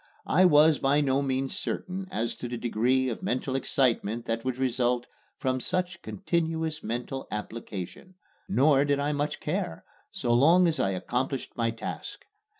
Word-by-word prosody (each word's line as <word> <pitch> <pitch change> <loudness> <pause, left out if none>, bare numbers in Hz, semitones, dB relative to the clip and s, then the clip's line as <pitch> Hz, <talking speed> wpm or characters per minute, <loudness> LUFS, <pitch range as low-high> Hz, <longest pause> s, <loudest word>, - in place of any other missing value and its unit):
I 185 +4 +4
was 155 -2 +6
by 140 +2 +3
no 140 -1 +2
means 135 -1 -1
certain 185 +1 -4
as 120 -11 -2
to 125 - -5
the 120 0 -4
degree 125 +3 +1
of 115 - -3
mental 130 +1 -1
excitement 120 -4 +1
that 115 0 -2
would 130 -1 -2
result 125 -1 +1 0.3
from 130 0 0
such 180 +4 -1
continuous 160 -4 -2
mental 125 +4 -4
application; 105 - -6 0.3
nor 140 -5 +4
did 145 -1 +1
I 145 +1 0
much 145 0 -2
care, 150 - -3 0.2
so 120 - -1
long 165 +9 +6
as 160 -1 0
I 95 - +2
accomplished 125 +7 -2
my 115 -1 +1
task. 115 0 -6
135 Hz, 155 wpm, -28 LUFS, 120-155 Hz, 0.3 s, was